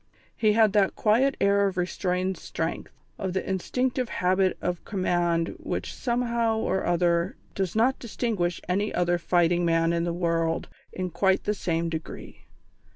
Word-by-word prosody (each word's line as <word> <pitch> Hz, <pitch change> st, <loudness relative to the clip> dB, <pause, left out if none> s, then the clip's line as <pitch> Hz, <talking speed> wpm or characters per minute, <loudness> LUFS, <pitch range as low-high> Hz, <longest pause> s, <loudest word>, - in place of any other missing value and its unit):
He 215 Hz, -2 st, +3 dB
had 220 Hz, -2 st, +4 dB
that 200 Hz, -2 st, +3 dB
quiet 250 Hz, +6 st, +2 dB
air 200 Hz, 0 st, +3 dB
of 190 Hz, -1 st, -4 dB
restrained 180 Hz, +1 st, -1 dB
strength, 165 Hz, -1 st, -4 dB, 0.3 s
of 190 Hz, -2 st, -2 dB
the 190 Hz, -, -2 dB
instinctive 250 Hz, +6 st, -1 dB
habit 185 Hz, +1 st, +1 dB
of 180 Hz, -1 st, -3 dB
command 175 Hz, -4 st, 0 dB
which -, -, -4 dB
somehow 235 Hz, -2 st, 0 dB
or 190 Hz, -3 st, -1 dB
other 175 Hz, 0 st, +1 dB, 0.2 s
does 190 Hz, -2 st, -2 dB
not 245 Hz, +4 st, +2 dB
distinguish 210 Hz, -7 st, -2 dB
any 200 Hz, +4 st, 0 dB
other 175 Hz, 0 st, +1 dB
fighting 175 Hz, 0 st, +2 dB
man 165 Hz, 0 st, +2 dB
in 170 Hz, 0 st, 0 dB
the 170 Hz, -, -1 dB
world 165 Hz, -1 st, 0 dB, 0.2 s
in 185 Hz, -1 st, -4 dB
quite 190 Hz, +3 st, +2 dB
the 210 Hz, -, 0 dB
same 170 Hz, -4 st, -1 dB
degree. 160 Hz, -1 st, -7 dB
185 Hz, 155 wpm, -26 LUFS, 175-210 Hz, 0.3 s, had